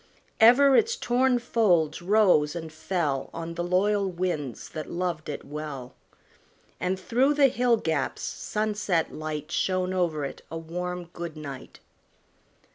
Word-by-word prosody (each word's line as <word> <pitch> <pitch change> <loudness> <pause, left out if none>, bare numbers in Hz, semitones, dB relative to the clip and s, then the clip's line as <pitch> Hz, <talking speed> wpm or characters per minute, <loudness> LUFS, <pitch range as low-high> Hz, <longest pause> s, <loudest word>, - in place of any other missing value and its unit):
Ever 260 +5 +7
its 455 +2 +3
torn 250 - +2
folds 185 -11 +2
rose 180 -6 +3
and 160 -2 -6
fell 155 -4 -2
On 165 0 -5
the 175 +1 -3
loyal 195 +3 +1
winds 170 -8 -3
that 155 -1 -6
loved 170 -3 -3
it 145 - -5
well; 140 -4 -6 0.9
And 185 +1 -1
through 255 +9 +2
the 280 -2 +5
hill 245 -1 +2
gaps 160 -9 -2
sunset 210 -5 -1
light 155 0 -5
Shone 185 0 0
over 165 -6 0
it 135 - -7
a 165 - -5
warm 180 +2 -4
good 170 -2 -6
night. 140 -4 -9
175 Hz, 135 wpm, -26 LUFS, 155-210 Hz, 0.9 s, Ever